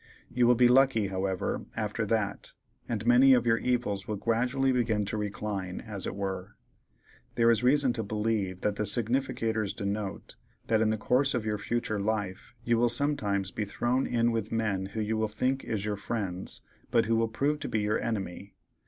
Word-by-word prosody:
You 120 -1 +3
will 125 - +6
be 125 +1 +5
lucky, 125 -5 +4
however, 95 -1 -2
after 105 0 -2
that, 100 -2 -2 0.4
and 110 -2 -2
many 125 +3 +7
of 120 -2 +3
your 115 -1 +3
evils 115 -6 -1
will 105 - -2
gradually 125 +5 +1
begin 115 -5 +1
to 105 - -3
recline, 100 -3 -3
as 105 -4 -6
it - - -4
were. 95 0 -4 0.8
There 115 0 +5
is 115 - +2
reason 130 0 +3
to 115 - -2
believe 105 -3 -1
that 105 -1 -1
the 105 - 0
significators 115 -3 0
denote 100 0 -4 0.3
that 110 -1 +2
in 110 - +3
the 110 - 0
course 130 +5 +2
of 115 -3 -2
your 105 -1 -1
futur' 110 -1 -2
life 105 +1 -3
you 120 -1 +2
will 120 0 +4
sometimes 110 -8 0
be 105 - -3
thrown 120 +5 0
in 120 -1 +2
with 110 -2 -2
men 105 -4 -1
who 110 +3 -4
you 110 +1 -1
will 110 0 +1
think 130 +5 -1
is 105 -3 -3
your 105 -1 -2
friends, 100 -4 -4 0.3
but 115 -1 +3
who 115 +1 +1
will 115 0 +2
prove 140 +6 -1
to - - -5
be 110 - 0
your 105 +1 0
enemy. 100 -3 -4
110 Hz, 190 wpm, -29 LUFS, 100-120 Hz, 0.8 s, many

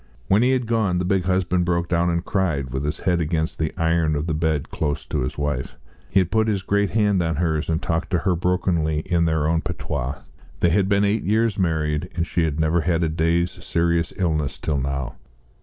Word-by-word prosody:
When 100 +3 +4
he 125 - +3
had 130 -2 +1
gone, 110 -6 +1
the 90 - -1
big 95 -1 +1
husband 90 -1 +1
broke 85 0 0
down 85 0 +1
and 85 0 -1
cried, 80 -10 -1
with 65 +2 -2
his 75 - -3
head 90 -2 +1
against 80 0 -1
the 80 -1 0
iron 80 -1 +2
of 75 +1 -2
the 85 - -1
bed 80 -2 -1
close 75 -2 -2
to - - -2
his 65 - -3
wife. 75 -3 -2 0.3
He 95 0 +4
put 110 +5 +1
his 100 -3 0
great 100 0 +1
hand 105 -1 +2
on 80 -1 0
hers, 80 -1 -1
and 80 0 +1
talked 85 -1 -2
to 90 - +1
her 90 +1 +1
brokenly 85 -3 0
in 85 +1 +1
their 80 -2 +1
own 80 0 +1
patois. 70 -1 -4 0.4
They 85 - +4
had 95 +3 +2
been 100 0 +3
eight 105 +2 +1
years 110 0 +1
married, 80 -1 0
and 85 -1 0
she 85 -1 0
had 75 -1 -2
never 80 +2 +2
had 85 +1 +1
a 80 - +1
day's 85 +2 +1
serious 85 0 +1
illness 75 -7 -1
till 75 -3 -1
now. 70 -1 -3
85 Hz, 220 wpm, -23 LUFS, 80-90 Hz, 0.4 s, When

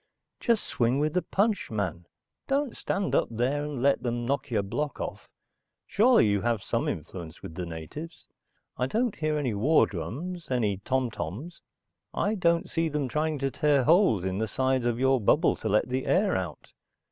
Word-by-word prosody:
Just 230 -3 +2
swing 120 +2 +1
with 155 +1 0
the 180 - +2
punch, 205 +2 0
man. 95 -5 -3 0.4
Don't 275 -2 0
stand 195 -1 -2
up - - +2
and 135 +3 -1
let 140 0 +3
'em 120 -1 -2
knock 140 +3 -1
your 110 -4 +1
block 145 +9 -3
off. - - -5 0.6
Surely 235 - +4
you 100 -2 +2
have 115 -4 0
some - - -1
influence 80 +1 -6
with - - -7
the 90 +1 -5
natives. 85 - -8 0.5
I 125 - 0
don't 230 - 0
hear 155 -1 0
any 135 -6 -1
war 135 +11 +4
drums, 150 - -6
any 110 -6 +1
tom 130 +4 -1
toms. 115 - -6 0.5
I 205 - +1
don't 170 -4 +2
see 165 -1 0
them 150 -3 -1
trying 155 +1 0
to 135 0 -1
tear 145 -2 +2
holes 160 - +4
in 95 +1 -1
the 110 - 0
sides 130 +2 0
of 120 -1 +1
your 130 0 +3
bubble 150 - +3
to 110 - -3
let 105 +1 +2
the 130 +1 -2
air - - +3
out. - - -5
130 Hz, 180 wpm, -28 LUFS, 110-160 Hz, 0.6 s, Surely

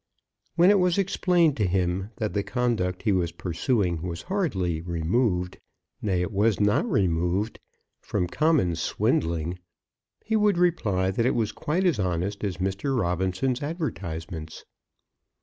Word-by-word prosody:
When 175 +3 +6
it 205 - +4
was 180 -1 +2
explained 180 -5 +2
to 105 -4 +1
him 90 +2 0
that 110 - -3
the 100 - +1
conduct 100 -3 -1
he 110 - +2
was 90 -3 +1
pursuing 90 - -1
was 85 -1 -5
hardly 95 - -1
removed, 90 +3 0 0.4
nay, 95 -4 0
it 90 - -3
was 105 +2 +2
not 105 0 +2
removed, 90 +3 0 0.4
from 90 - -1
common 140 - +2
swindling, 85 +1 0 0.7
he 220 - 0
would 210 -3 +3
reply 105 - +1
that 115 +5 +1
it - - +1
was 110 -2 0
quite 175 +6 -1
as 175 - +2
honest 95 +2 -2
as 95 -5 -2
Mr. 95 +9 -1
Robinson's 95 +7 0
advertisements. 85 - -5
100 Hz, 140 wpm, -26 LUFS, 90-135 Hz, 0.7 s, When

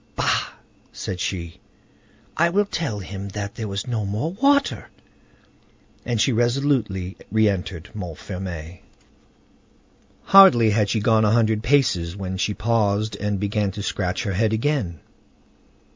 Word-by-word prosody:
"Bah!" - - 0 0.4
said 90 - -5
she; 85 -3 -4 0.8
"I 170 +1 +3
will 205 +4 +2
tell 155 - -3
him 100 0 -7
that 100 0 -5
there 110 - -5
was 100 +2 -4
no 115 -4 -2
more 105 +11 -2
water!" 280 +8 +1 1.2
And 120 -2 0
she 130 - +3
resolutely 120 -6 0
re 110 0 +3
entered 90 -4 -3
Montfermeil. 90 -3 -7 1.4
Hardly 155 - +7
had 105 -1 +1
she 110 - 0
gone 110 0 +3
a 105 - +3
hundred 110 -1 +2
paces 115 -10 +1
when 95 -1 -4
she 105 +2 -1
paused 110 -2 0
and 105 -1 -2
began 105 0 0
to 105 0 -6
scratch 95 -1 -2
her 100 -4 -2
head 110 +3 +1
again. 110 - -1
105 Hz, 135 wpm, -23 LUFS, 95-120 Hz, 1.4 s, Hardly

